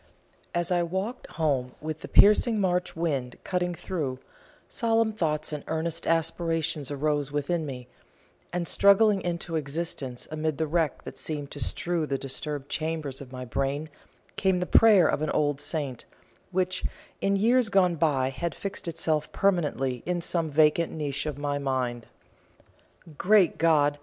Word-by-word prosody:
As 175 Hz, +1 st, 0 dB
I 175 Hz, -1 st, +3 dB
walked 190 Hz, +8 st, -3 dB
home, 135 Hz, -6 st, 0 dB
with 155 Hz, 0 st, -5 dB
the -, -, -8 dB
piercing 210 Hz, +2 st, +5 dB
March 180 Hz, -2 st, 0 dB
wind 140 Hz, -7 st, -2 dB
cutting 180 Hz, -1 st, -1 dB
me -, -, -10 dB
through, 155 Hz, -7 st, -3 dB, 0.5 s
solemn 225 Hz, -2 st, +1 dB
thoughts 155 Hz, -6 st, -1 dB
and 150 Hz, -, -4 dB
earnest 165 Hz, +1 st, -2 dB
aspirations 165 Hz, -2 st, 0 dB
arose 145 Hz, 0 st, -1 dB
within 150 Hz, +2 st, -1 dB
me, 125 Hz, -2 st, -7 dB, 0.6 s
and, 175 Hz, -1 st, -1 dB
struggling 200 Hz, 0 st, +5 dB
into 170 Hz, -1 st, -3 dB
existence 140 Hz, -4 st, -4 dB
amid 155 Hz, -1 st, -2 dB
the 160 Hz, -, 0 dB
wreck 160 Hz, -2 st, 0 dB
that -, -, -9 dB
seemed 145 Hz, -2 st, -4 dB
to 145 Hz, -, -5 dB
strew 170 Hz, +4 st, -1 dB
the 140 Hz, -, -1 dB
disturbed 140 Hz, +1 st, -5 dB
chambers 155 Hz, -4 st, -3 dB
of 130 Hz, -2 st, -10 dB
my 125 Hz, -1 st, -6 dB
brain, 140 Hz, +5 st, -2 dB, 0.5 s
came 190 Hz, -2 st, +2 dB
the 180 Hz, -, -1 dB
prayer 205 Hz, -5 st, +6 dB
of -, -, 0 dB
an 155 Hz, -, 0 dB
old 145 Hz, -1 st, +1 dB
saint, 145 Hz, -4 st, -3 dB, 0.4 s
which, 185 Hz, 0 st, 0 dB, 0.4 s
in 195 Hz, 0 st, +2 dB
years 230 Hz, +3 st, +3 dB
gone 185 Hz, -3 st, +4 dB
by, 145 Hz, -5 st, +1 dB
had 170 Hz, +4 st, -3 dB
fixed 200 Hz, -2 st, -5 dB
itself 155 Hz, -2 st, -1 dB
permanently 145 Hz, -10 st, 0 dB
in 180 Hz, -1 st, 0 dB
some 165 Hz, -1 st, -1 dB
vacant 155 Hz, +2 st, +3 dB
niche 150 Hz, -1 st, -3 dB
of 150 Hz, -3 st, -4 dB
my 145 Hz, 0 st, -2 dB
mind: 125 Hz, -4 st, -2 dB, 1.1 s
"Great 195 Hz, -2 st, +4 dB
God! 145 Hz, -3 st, +3 dB
160 Hz, 155 wpm, -27 LUFS, 145-180 Hz, 1.1 s, prayer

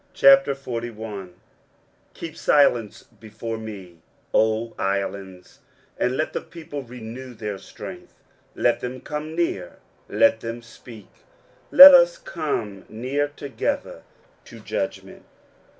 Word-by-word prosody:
23:041:001 120 Hz, -, +2 dB, 0.9 s
Keep 165 Hz, -1 st, -8 dB
silence 120 Hz, -7 st, +2 dB, 0.2 s
before 110 Hz, +1 st, -6 dB
me, 95 Hz, -6 st, -10 dB, 0.3 s
O 110 Hz, +1 st, +1 dB
islands; 95 Hz, -1 st, -4 dB, 0.4 s
and 125 Hz, +1 st, -1 dB
let 155 Hz, -, -2 dB
the -, -, -3 dB
people 160 Hz, -4 st, -8 dB
renew 125 Hz, 0 st, -9 dB
their 105 Hz, -3 st, -5 dB
strength: -, -, -11 dB, 0.4 s
let -, -, +1 dB
them 125 Hz, +1 st, -6 dB
come 150 Hz, +3 st, -6 dB
near; 100 Hz, -, -2 dB, 0.3 s
then -, -, -7 dB
let 110 Hz, -, +5 dB
them 115 Hz, +1 st, -6 dB
speak: 115 Hz, -2 st, -14 dB, 0.6 s
let 280 Hz, +1 st, +12 dB
us 175 Hz, -7 st, +6 dB
come 115 Hz, -, -4 dB
near 130 Hz, +6 st, -2 dB
together 280 Hz, -, -4 dB, 0.4 s
to -, -, -13 dB
judgment. -, -, -5 dB
120 Hz, 110 wpm, -23 LUFS, 110-145 Hz, 0.9 s, let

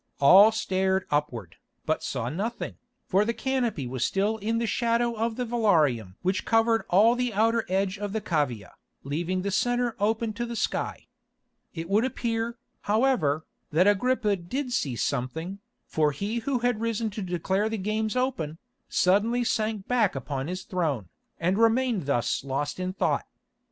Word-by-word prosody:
All 195 Hz, +10 st, +8 dB
stared 190 Hz, -3 st, 0 dB
upward, 125 Hz, -, -2 dB, 0.3 s
but -, -, 0 dB
saw 115 Hz, -, -3 dB
nothing, 205 Hz, -, -4 dB, 0.3 s
for 195 Hz, +2 st, +3 dB
the 230 Hz, +2 st, -1 dB
canopy 240 Hz, -, -1 dB
was 125 Hz, 0 st, -3 dB
still 205 Hz, +3 st, +1 dB
in 220 Hz, +2 st, -1 dB
the 230 Hz, -, 0 dB
shadow 235 Hz, +1 st, +1 dB
of 225 Hz, 0 st, -1 dB
the 250 Hz, -, -2 dB
velarium 155 Hz, -, +2 dB
which 185 Hz, +1 st, 0 dB
covered 225 Hz, 0 st, +3 dB
all 210 Hz, +6 st, +5 dB
the 245 Hz, 0 st, -1 dB
outer 225 Hz, +2 st, +3 dB
edge 195 Hz, +1 st, 0 dB
of 205 Hz, -1 st, -3 dB
the 220 Hz, -, -1 dB
cavea, 145 Hz, -, -1 dB, 0.3 s
leaving 175 Hz, +6 st, -2 dB
the 200 Hz, -, -1 dB
centre 245 Hz, +3 st, +1 dB
open 220 Hz, +2 st, 0 dB
to 240 Hz, +3 st, -3 dB
the 235 Hz, -, -5 dB
sky. -, -, -2 dB, 0.7 s
It 165 Hz, 0 st, -4 dB
would 205 Hz, +4 st, +3 dB
appear, 235 Hz, -2 st, -2 dB, 0.3 s
however, 210 Hz, -, +2 dB, 0.3 s
that 165 Hz, +5 st, +4 dB
Agrippa 210 Hz, +1 st, +2 dB
did 250 Hz, +9 st, -4 dB
see 140 Hz, -, 0 dB
something, 155 Hz, -, -3 dB, 0.3 s
for 150 Hz, -2 st, +1 dB
he 205 Hz, +10 st, -2 dB
who 260 Hz, +3 st, -1 dB
had 245 Hz, -2 st, 0 dB
risen 230 Hz, -1 st, -1 dB
to 210 Hz, -, -5 dB
declare 190 Hz, +3 st, 0 dB
the 225 Hz, -, -2 dB
games 215 Hz, +3 st, -1 dB
open, 205 Hz, -, -1 dB, 0.3 s
suddenly 215 Hz, +6 st, +2 dB
sank 215 Hz, -3 st, -1 dB
back 235 Hz, -6 st, +2 dB
upon 135 Hz, -1 st, -4 dB
his 185 Hz, +2 st, -4 dB
throne, 150 Hz, -, -2 dB, 0.3 s
and 185 Hz, +5 st, +1 dB
remained 230 Hz, -, +2 dB
thus 120 Hz, -3 st, 0 dB
lost 140 Hz, +4 st, -3 dB
in 185 Hz, 0 st, -2 dB
thought. 185 Hz, -, 0 dB
205 Hz, 160 wpm, -27 LUFS, 165-230 Hz, 0.7 s, All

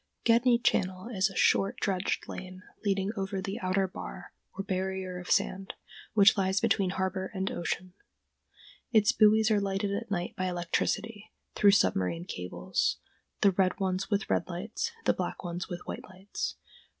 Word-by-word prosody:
] -, -, -42 dB
Gedney 235 Hz, +1 st, +5 dB
Channel 185 Hz, -3 st, 0 dB
is 200 Hz, -3 st, +1 dB
a 195 Hz, -, -12 dB
short, 195 Hz, -, +3 dB
dredged 190 Hz, -1 st, -1 dB
lane 185 Hz, 0 st, -8 dB, 0.2 s
leading 195 Hz, -1 st, +1 dB
over 195 Hz, -1 st, -2 dB
the 195 Hz, +1 st, -4 dB
outer 190 Hz, +1 st, +1 dB
bar, 185 Hz, 0 st, -8 dB, 0.2 s
or 195 Hz, -, -5 dB
barrier 190 Hz, -1 st, -3 dB
of 180 Hz, -, -9 dB
sand, 190 Hz, +1 st, 0 dB, 0.4 s
which 200 Hz, -1 st, +7 dB
lies 190 Hz, -1 st, +1 dB
between 195 Hz, -2 st, +2 dB
harbor 190 Hz, 0 st, -2 dB
and 190 Hz, 0 st, -1 dB
ocean. 175 Hz, +1 st, -3 dB, 1.0 s
Its 215 Hz, -2 st, +5 dB
buoys 215 Hz, +1 st, +5 dB
are 210 Hz, -1 st, +3 dB
lighted 200 Hz, 0 st, -1 dB
at 230 Hz, +2 st, -5 dB
night 175 Hz, -3 st, -2 dB
by 185 Hz, -, -2 dB
electricity, 185 Hz, +5 st, -2 dB, 0.2 s
through 205 Hz, -, +5 dB
submarine 90 Hz, -, +2 dB
cables, 90 Hz, -10 st, -1 dB, 0.4 s
the 200 Hz, -, +6 dB
red 185 Hz, +1 st, +1 dB
ones 190 Hz, 0 st, -1 dB
with 205 Hz, 0 st, 0 dB
red 170 Hz, -, +1 dB
lights, 215 Hz, -, -3 dB, 0.2 s
the -, -, +4 dB
black -, -, -4 dB
ones 175 Hz, 0 st, -4 dB
with 175 Hz, 0 st, -5 dB
white -, -, -5 dB
lights. 190 Hz, +1 st, -5 dB
190 Hz, 160 wpm, -29 LUFS, 185-205 Hz, 1.0 s, which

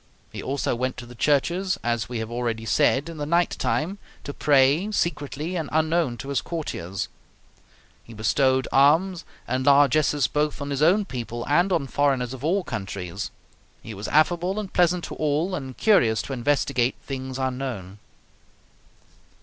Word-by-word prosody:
He -, -, -6 dB
also 140 Hz, +1 st, -1 dB
went 130 Hz, +2 st, -2 dB
to 120 Hz, -, -7 dB
the 120 Hz, -, -12 dB
churches, 170 Hz, +9 st, +1 dB
as 120 Hz, -1 st, -1 dB
we 125 Hz, -, -3 dB
have 110 Hz, 0 st, -4 dB
already 120 Hz, -2 st, -2 dB
said, 135 Hz, +6 st, +2 dB
in 165 Hz, -1 st, -8 dB
the 145 Hz, -, -3 dB
night 170 Hz, +2 st, +2 dB
time, 185 Hz, +7 st, -1 dB, 0.2 s
to 145 Hz, -, -6 dB
pray, 145 Hz, +9 st, +3 dB
secretly 160 Hz, -2 st, -2 dB
and 160 Hz, -4 st, -3 dB
unknown 160 Hz, -4 st, +1 dB
to 135 Hz, -, -7 dB
his 140 Hz, -, 0 dB
courtiers; 100 Hz, -, -4 dB, 1.0 s
he 115 Hz, -, -13 dB
bestowed 130 Hz, +4 st, +2 dB
alms 160 Hz, +7 st, +3 dB, 0.2 s
and 130 Hz, +1 st, -1 dB
largesses 145 Hz, 0 st, +4 dB
both 150 Hz, +2 st, -1 dB
on 140 Hz, 0 st, -4 dB
his 140 Hz, 0 st, -2 dB
own 190 Hz, +7 st, +4 dB
people 120 Hz, -, -5 dB
and 175 Hz, +6 st, +3 dB
on 165 Hz, -6 st, +1 dB
foreigners 135 Hz, -2 st, 0 dB
of 130 Hz, 0 st, -9 dB
all 185 Hz, +5 st, +1 dB
countries; 95 Hz, -, -5 dB, 0.5 s
he 115 Hz, -, -7 dB
was 105 Hz, +1 st, -6 dB
affable 175 Hz, +6 st, +2 dB
and 200 Hz, -3 st, -6 dB
pleasant 175 Hz, 0 st, +2 dB
to -, -, -6 dB
all, 155 Hz, +5 st, 0 dB
and 135 Hz, -7 st, -5 dB
curious 120 Hz, -, +3 dB
to 135 Hz, -, -5 dB
investigate 130 Hz, -1 st, +1 dB
things 130 Hz, -1 st, -5 dB
unknown." 125 Hz, -7 st, -4 dB
140 Hz, 160 wpm, -24 LUFS, 120-165 Hz, 1.0 s, largesses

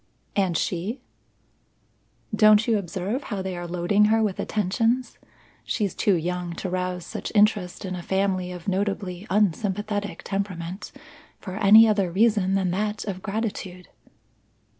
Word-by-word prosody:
"And 185 Hz, -5 st, +1 dB
she?" 195 Hz, +8 st, -2 dB, 1.4 s
"Don't 215 Hz, +1 st, +6 dB
you 225 Hz, -3 st, +3 dB
observe 195 Hz, -, -4 dB
how 195 Hz, -2 st, -4 dB
they 190 Hz, -1 st, -4 dB
are 175 Hz, 0 st, -5 dB
loading 180 Hz, +4 st, +2 dB
her 220 Hz, +1 st, +3 dB
with 200 Hz, -4 st, -1 dB
attentions? 225 Hz, +5 st, 0 dB, 0.4 s
She's 205 Hz, -6 st, -1 dB
too 200 Hz, -, +2 dB
young 175 Hz, +1 st, -3 dB
to 180 Hz, +2 st, -5 dB
rouse 180 Hz, -1 st, -2 dB
such -, -, -6 dB
interest 205 Hz, -3 st, +2 dB
in 185 Hz, -, -4 dB
a 180 Hz, -, -5 dB
family 190 Hz, -1 st, 0 dB
of 180 Hz, 0 st, -9 dB
notably 195 Hz, -1 st, -2 dB
unsympathetic 205 Hz, +1 st, -1 dB
temperament 195 Hz, -2 st, -4 dB, 0.5 s
for 185 Hz, -2 st, -7 dB
any 215 Hz, +2 st, +8 dB
other 200 Hz, -5 st, +1 dB
reason 200 Hz, -1 st, +2 dB
than 190 Hz, -2 st, +1 dB
that 210 Hz, +3 st, -2 dB
of 190 Hz, -3 st, -4 dB
gratitude." 200 Hz, -4 st, -4 dB
195 Hz, 140 wpm, -25 LUFS, 180-210 Hz, 1.4 s, any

